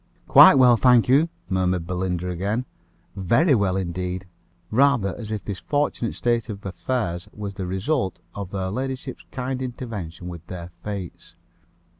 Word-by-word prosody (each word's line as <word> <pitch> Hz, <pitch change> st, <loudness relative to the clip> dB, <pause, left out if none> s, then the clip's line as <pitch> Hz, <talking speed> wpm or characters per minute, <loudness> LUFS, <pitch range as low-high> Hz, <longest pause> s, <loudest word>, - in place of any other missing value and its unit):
"Quite -, -, +9 dB
well, 125 Hz, -3 st, +6 dB
thank 125 Hz, -1 st, +5 dB
you," 145 Hz, +6 st, +4 dB, 0.2 s
murmured 95 Hz, -1 st, +1 dB
Miss -, -, -14 dB
Belinda 90 Hz, -1 st, -2 dB
again. 100 Hz, +8 st, -2 dB, 0.5 s
"Very 120 Hz, -, +3 dB
well 100 Hz, -5 st, +2 dB
indeed;" 90 Hz, 0 st, -3 dB, 0.5 s
rather 120 Hz, -5 st, +3 dB
as 110 Hz, -3 st, -7 dB
if 110 Hz, -2 st, -4 dB
this 100 Hz, -3 st, -4 dB
fortunate 145 Hz, -5 st, -1 dB
state 120 Hz, -1 st, 0 dB
of 100 Hz, -2 st, -7 dB
affairs 90 Hz, -3 st, -3 dB
was 100 Hz, -1 st, -6 dB
the 95 Hz, -2 st, -5 dB
result 95 Hz, -, -1 dB, 0.2 s
of 100 Hz, -3 st, -6 dB
her 95 Hz, -1 st, -2 dB
ladyship's 130 Hz, +3 st, -5 dB
kind 130 Hz, 0 st, -3 dB
intervention 105 Hz, -10 st, -6 dB
with 85 Hz, -3 st, -8 dB
the 90 Hz, -1 st, -7 dB
fates. 95 Hz, -4 st, -7 dB
100 Hz, 150 wpm, -24 LUFS, 90-125 Hz, 0.5 s, Quite